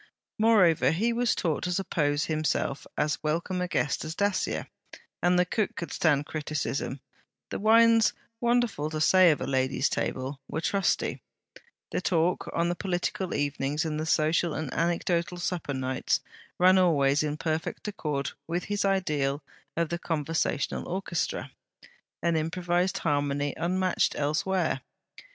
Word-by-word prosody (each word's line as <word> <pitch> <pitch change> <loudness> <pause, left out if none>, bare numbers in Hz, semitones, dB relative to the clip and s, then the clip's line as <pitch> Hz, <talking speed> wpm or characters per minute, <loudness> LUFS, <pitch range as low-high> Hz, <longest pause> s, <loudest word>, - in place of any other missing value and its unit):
Moreover, 185 - +5
he 215 +10 +1
was 240 0 +1
taught 160 -4 -1
to 180 - -1
suppose 165 -6 0
himself 155 -3 -1
as 150 - 0
welcome 170 +4 -1
a 180 - -1
guest 150 -4 0
as 155 +1 -5
Dacier; 200 0 0 0.6
and 180 0 +3
the 180 - +4
cook 210 +2 -1
could 170 -4 -5
stand 145 -3 +2
criticism; 145 -3 -3 0.5
the - - -3
wines 225 +1 +5 0.3
wonderful 235 -10 +1
to 155 0 -3
say 185 +3 +6
of 155 - +2
a - - -1
lady's 130 +1 +1
table 135 +1 -3
were - - -3
trusty; 195 +3 0 0.7
the - - -1
talk, 175 -1 +1
on 170 - +1
the 175 - 0
political 185 0 -2
evenings 145 +2 -1
and 155 -1 -2
the 155 - -3
social 160 +1 +2
and 155 -4 -4
anecdotal 170 +1 0
supper 175 -5 -3
nights, 130 0 0 0.4
ran 185 +1 +6
always 145 -5 +3
in 150 -1 -2
perfect 160 +5 -3
accord 150 -9 -2 0.2
with 175 +2 -2
his 205 0 -1
ideal 150 -8 0 0.3
of 170 -2 +1
the 170 - -2
conversational 160 -3 -1
orchestra: 185 -2 -2 0.7
an 170 0 +2
improvized 175 +3 0
harmony, 145 -2 0
unmatched 185 +2 +1
elsewhere. 155 +1 0
165 Hz, 140 wpm, -28 LUFS, 150-185 Hz, 0.7 s, say